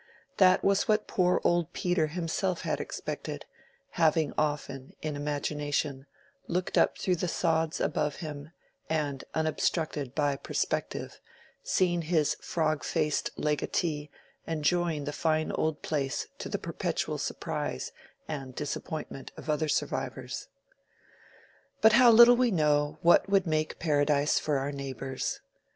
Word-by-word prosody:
That 185 Hz, -1 st, +5 dB
was 200 Hz, 0 st, +3 dB
what 215 Hz, 0 st, +2 dB
poor 180 Hz, -1 st, +2 dB
old 175 Hz, 0 st, +1 dB
Peter 175 Hz, -3 st, +1 dB
himself 175 Hz, +3 st, -2 dB
had -, -, -1 dB
expected; -, -, -5 dB, 0.5 s
having 160 Hz, -2 st, +2 dB
often, 145 Hz, -3 st, -2 dB
in 155 Hz, -1 st, -2 dB
imagination, 145 Hz, -1 st, -2 dB, 0.4 s
looked 180 Hz, +1 st, -1 dB
up -, -, +3 dB
through 180 Hz, -2 st, 0 dB
the 180 Hz, -, -1 dB
sods 160 Hz, -2 st, 0 dB
above 150 Hz, -1 st, 0 dB
him, 150 Hz, -2 st, -7 dB, 0.4 s
and, 145 Hz, -4 st, -1 dB
unobstructed 155 Hz, -3 st, -1 dB
by 145 Hz, -2 st, +1 dB
perspective, -, -, -3 dB, 0.4 s
seen 175 Hz, -2 st, +1 dB
his 160 Hz, -2 st, +2 dB
frog 155 Hz, -2 st, 0 dB
faced 155 Hz, -3 st, 0 dB
legatee 150 Hz, 0 st, -1 dB, 0.4 s
enjoying 165 Hz, 0 st, 0 dB
the 145 Hz, -, -3 dB
fine 155 Hz, 0 st, 0 dB
old 155 Hz, -1 st, -1 dB
place 140 Hz, -4 st, -1 dB
to -, -, -5 dB
the -, -, -1 dB
perpetual -, -, -3 dB
surprise 65 Hz, -, -3 dB, 0.4 s
and 135 Hz, -4 st, -5 dB
disappointment 150 Hz, -1 st, -5 dB
of 155 Hz, -, -3 dB
other 155 Hz, +1 st, 0 dB
survivors. -, -, -2 dB, 1.3 s
But 220 Hz, 0 st, +6 dB
how 245 Hz, +1 st, +8 dB
little 235 Hz, +2 st, +9 dB
we 250 Hz, 0 st, +3 dB
know 150 Hz, -5 st, +2 dB
what 175 Hz, +3 st, +5 dB
would 195 Hz, -1 st, +3 dB
make 155 Hz, -1 st, -1 dB
paradise 145 Hz, -2 st, +2 dB
for 150 Hz, -2 st, 0 dB
our 135 Hz, +2 st, -2 dB
neighbors! 135 Hz, -1 st, -4 dB
155 Hz, 130 wpm, -29 LUFS, 145-175 Hz, 1.3 s, little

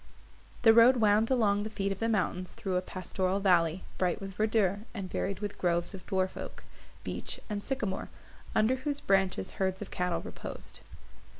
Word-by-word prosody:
The 225 Hz, -1 st, +8 dB
road 235 Hz, +3 st, +7 dB
wound 215 Hz, 0 st, +4 dB
along 210 Hz, -6 st, +3 dB
the 215 Hz, -, -3 dB
feet 200 Hz, -2 st, -2 dB
of 195 Hz, -, -4 dB
the 230 Hz, -, 0 dB
mountains 185 Hz, -4 st, -1 dB
through 190 Hz, -2 st, -3 dB
a 180 Hz, -, +2 dB
pastoral 185 Hz, +1 st, -2 dB
valley, 180 Hz, -3 st, +3 dB, 0.2 s
bright 180 Hz, +1 st, +1 dB
with 195 Hz, -1 st, -7 dB
verdure, 210 Hz, -1 st, +2 dB, 0.2 s
and 195 Hz, -3 st, -5 dB
varied 195 Hz, +1 st, -2 dB
with 205 Hz, -1 st, -4 dB
groves 175 Hz, +1 st, +1 dB
of 185 Hz, -2 st, -10 dB
dwarf 185 Hz, -1 st, 0 dB
oak, -, -, -7 dB, 0.4 s
beech -, -, -4 dB
and 205 Hz, -1 st, -3 dB
sycamore, 215 Hz, -8 st, -2 dB, 0.5 s
under 220 Hz, +4 st, +3 dB
whose 285 Hz, +2 st, -2 dB
branches 190 Hz, -, +1 dB
herds 190 Hz, 0 st, +1 dB
of 210 Hz, -, -7 dB
cattle 180 Hz, -1 st, -1 dB
reposed. -, -, -8 dB
195 Hz, 175 wpm, -30 LUFS, 185-215 Hz, 0.5 s, The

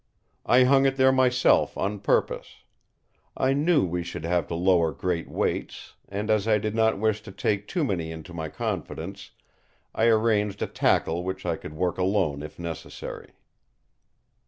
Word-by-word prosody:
I 125 Hz, +1 st, +6 dB
hung 135 Hz, +1 st, +5 dB
it 135 Hz, -, 0 dB
there 130 Hz, 0 st, +5 dB
myself 125 Hz, -1 st, +3 dB
on 100 Hz, +2 st, -2 dB
purpose. 100 Hz, -, -1 dB, 0.7 s
I 130 Hz, +1 st, +2 dB
knew 150 Hz, -, +3 dB
we 90 Hz, 0 st, -2 dB
should 85 Hz, -, -6 dB
have 85 Hz, 0 st, 0 dB
to 85 Hz, -, -4 dB
lower 85 Hz, -2 st, +3 dB
great 85 Hz, +3 st, -3 dB
weights; -, -, -3 dB, 0.2 s
and 105 Hz, +2 st, -2 dB
as 110 Hz, -1 st, +1 dB
I 110 Hz, -1 st, +4 dB
did 105 Hz, 0 st, -3 dB
not 110 Hz, -1 st, +2 dB
wish 110 Hz, 0 st, 0 dB
to 100 Hz, -, -10 dB
take 100 Hz, +1 st, -1 dB
too 175 Hz, -, -1 dB
many 85 Hz, -, -2 dB
into 80 Hz, +2 st, -9 dB
my 80 Hz, -2 st, -4 dB
confidence, 95 Hz, +6 st, -5 dB, 0.6 s
I 110 Hz, -, +1 dB
arranged 110 Hz, -3 st, +2 dB
a -, -, +1 dB
tackle 85 Hz, +2 st, +1 dB
which 95 Hz, +1 st, -5 dB
I -, -, 0 dB
could 75 Hz, -, -10 dB
work 90 Hz, +2 st, -1 dB
alone 90 Hz, -6 st, +1 dB
if 75 Hz, 0 st, -9 dB
necessary." 85 Hz, -3 st, -7 dB
100 Hz, 165 wpm, -26 LUFS, 85-110 Hz, 0.7 s, I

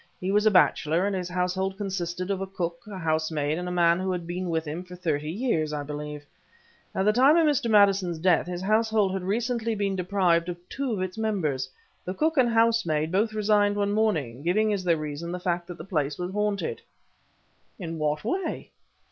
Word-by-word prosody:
He 185 Hz, +1 st, -2 dB
was 210 Hz, +2 st, +3 dB
a -, -, +8 dB
bachelor, 175 Hz, -3 st, +3 dB
and 200 Hz, -1 st, 0 dB
his 180 Hz, -1 st, -3 dB
household 185 Hz, +2 st, -1 dB
consisted 185 Hz, -2 st, -3 dB
of 195 Hz, -1 st, -2 dB
a 195 Hz, -, -3 dB
cook, 175 Hz, -3 st, -4 dB
a 200 Hz, -2 st, -7 dB
housemaid, 155 Hz, -2 st, -1 dB
and 180 Hz, -, -4 dB
a -, -, -3 dB
man 170 Hz, -1 st, +3 dB
who 190 Hz, 0 st, -1 dB
had 175 Hz, -2 st, -3 dB
been 180 Hz, +1 st, -4 dB
with 160 Hz, -1 st, -1 dB
him 155 Hz, +4 st, -5 dB
for 180 Hz, 0 st, -11 dB
thirty 155 Hz, -4 st, -2 dB
years, 165 Hz, -6 st, 0 dB
I 145 Hz, -1 st, -2 dB
believe. 150 Hz, 0 st, -6 dB, 0.7 s
At 190 Hz, -, +1 dB
the 210 Hz, -, +4 dB
time 270 Hz, +7 st, +5 dB
of 330 Hz, -, +4 dB
Mr. 285 Hz, -6 st, +1 dB
Maddison's 195 Hz, -5 st, +4 dB
death, 175 Hz, +1 st, +2 dB
his 180 Hz, 0 st, -4 dB
household 215 Hz, -1 st, +2 dB
had 190 Hz, -, -2 dB
recently 230 Hz, +3 st, -1 dB
been 200 Hz, -1 st, -1 dB
deprived 180 Hz, -2 st, +1 dB
of 175 Hz, -, -4 dB
two 275 Hz, -2 st, -3 dB
of 190 Hz, -3 st, -1 dB
its 185 Hz, +3 st, -5 dB
members. 155 Hz, -12 st, -1 dB, 0.3 s
The 185 Hz, -, -4 dB
cook 315 Hz, +8 st, +1 dB
and 250 Hz, -2 st, +5 dB
housemaid 225 Hz, -10 st, +2 dB
both 215 Hz, +4 st, +1 dB
resigned 205 Hz, -1 st, +2 dB
one 205 Hz, 0 st, 0 dB
morning, 160 Hz, -, 0 dB
giving 210 Hz, +7 st, +2 dB
as 195 Hz, -2 st, -2 dB
their 170 Hz, -2 st, +2 dB
reason 155 Hz, +2 st, -5 dB
the 180 Hz, -, -4 dB
fact 175 Hz, -1 st, -2 dB
that 175 Hz, -, -8 dB
the 160 Hz, -, -8 dB
place 150 Hz, -6 st, -1 dB
was 180 Hz, +1 st, -4 dB
haunted." 210 Hz, -, -1 dB, 1.0 s
"In 165 Hz, -4 st, -5 dB
what 150 Hz, 0 st, -1 dB
way?" 365 Hz, -, -3 dB
185 Hz, 205 wpm, -26 LUFS, 170-210 Hz, 1.0 s, a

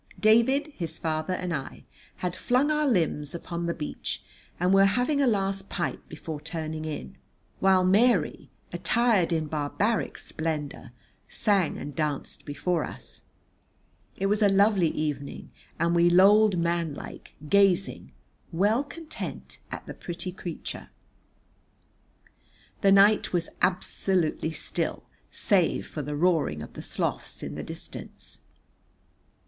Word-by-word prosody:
David, 260 Hz, +7 st, +4 dB
his 165 Hz, -2 st, -4 dB
father 160 Hz, +2 st, -1 dB
and 180 Hz, -2 st, -3 dB
I 135 Hz, -4 st, -5 dB, 0.3 s
had 180 Hz, -1 st, -3 dB
flung 255 Hz, +8 st, +2 dB
our 300 Hz, -1 st, +2 dB
limbs 160 Hz, -, 0 dB
upon 170 Hz, 0 st, -4 dB
the 170 Hz, -, 0 dB
beach 150 Hz, -, -4 dB, 0.4 s
and 180 Hz, +2 st, +3 dB
were 195 Hz, 0 st, +7 dB
having 250 Hz, +8 st, +2 dB
a 275 Hz, -, +3 dB
last 195 Hz, -3 st, 0 dB
pipe 175 Hz, -, -2 dB
before 155 Hz, -1 st, -6 dB
turning 155 Hz, 0 st, -4 dB
in, 145 Hz, -, -6 dB, 0.4 s
while 190 Hz, -1 st, +4 dB
Mary, 200 Hz, 0 st, +3 dB, 0.2 s
attired 210 Hz, 0 st, +2 dB
in 160 Hz, -2 st, +1 dB
barbaric 155 Hz, +9 st, -1 dB
splendour, 155 Hz, -6 st, -2 dB, 0.4 s
sang 195 Hz, -6 st, +1 dB
and 145 Hz, -2 st, -7 dB
danced 150 Hz, -2 st, -3 dB
before 155 Hz, +3 st, -1 dB
us. -, -, -9 dB, 0.9 s
It 195 Hz, -, -1 dB
was 205 Hz, +2 st, +2 dB
a 205 Hz, -, +6 dB
lovely 195 Hz, -2 st, +4 dB
evening, 145 Hz, -3 st, -4 dB, 0.3 s
and 170 Hz, +1 st, +1 dB
we 170 Hz, 0 st, +5 dB
lolled 200 Hz, +2 st, +6 dB
manlike, 170 Hz, -3 st, -3 dB
gazing, 195 Hz, +1 st, +2 dB, 0.4 s
well 205 Hz, +9 st, +2 dB
content, 315 Hz, +2 st, -7 dB
at -, -, -6 dB
the -, -, -7 dB
pretty 180 Hz, +1 st, -5 dB
creature. 175 Hz, -2 st, -6 dB, 1.9 s
The 195 Hz, -, +5 dB
night 200 Hz, +1 st, +5 dB
was 170 Hz, -2 st, 0 dB
absolutely 180 Hz, -2 st, +1 dB
still -, -, -2 dB, 0.3 s
save 190 Hz, -7 st, +1 dB
for 150 Hz, -, -5 dB
the 145 Hz, +1 st, -4 dB
roaring 150 Hz, -, +1 dB
of -, -, -11 dB
the -, -, -7 dB
Sloths -, -, -2 dB
in -, -, -5 dB
the -, -, -5 dB
distance. -, -, -8 dB
180 Hz, 130 wpm, -27 LUFS, 160-205 Hz, 1.9 s, were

